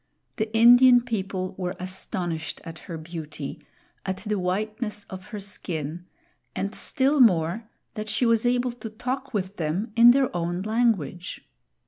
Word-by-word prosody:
The 220 -1 -1
Indian 245 +2 +8
people 190 -5 -3
were 180 0 -2
astonished 180 -3 -4
at 165 -1 -9
her 165 - -4
beauty, 155 -3 -7 0.4
at 190 -1 -2
the 210 -1 0
whiteness 210 +3 -2
of 190 0 -8
her 210 0 -7
skin, 175 -4 -6 0.5
and 200 +2 -2
still 275 +6 +1
more, 210 -1 +3 0.2
that 215 -1 -5
she 220 +3 +1
was 230 -1 +3
able 245 0 +1
to 235 -1 -8
talk 250 +5 -4
with 195 -3 -3
them 180 +8 -2
in 235 +1 +8
their 260 -4 +3
own 175 +1 -2
language. 215 - -1
205 Hz, 145 wpm, -25 LUFS, 175-235 Hz, 0.5 s, Indian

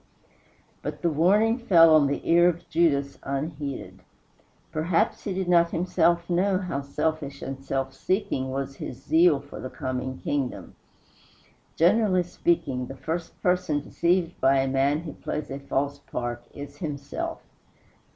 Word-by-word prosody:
But - - -6
the 170 - +2
warning 205 - +3
fell 165 -8 +6
on 150 -2 +6
the 140 - -3
ear 175 +1 +6
of 170 0 -5
Judas 145 -4 +1
unheeded. 140 0 -4 0.7
Perhaps 165 +7 0
he 200 - -1
did 190 -1 -2
not 170 -1 +4
himself 170 -1 +1
know 185 +2 +2
how 180 -7 -3
selfish 140 0 -3
and 135 0 -6
self 135 -1 -2
seeking 185 -9 -1
was 135 +1 -4
his 120 - -6
zeal 160 -1 +4
for 140 +1 -11
the 130 - -5
coming 130 0 -4
kingdom. 140 -3 -3 1.0
Generally 185 +1 +3
speaking, 150 -7 -1
the 135 - -9
first 165 +4 -4
person 180 -4 +1
deceived 170 +3 0
by 135 +1 +4
a 135 0 +2
man 135 +3 +1
who 165 -2 -7
plays 150 -2 -5
a 135 - -4
false 140 +1 -2
part 120 -2 -5
is 145 0 -9
himself. 145 -3 -5
155 Hz, 145 wpm, -26 LUFS, 140-175 Hz, 1.0 s, fell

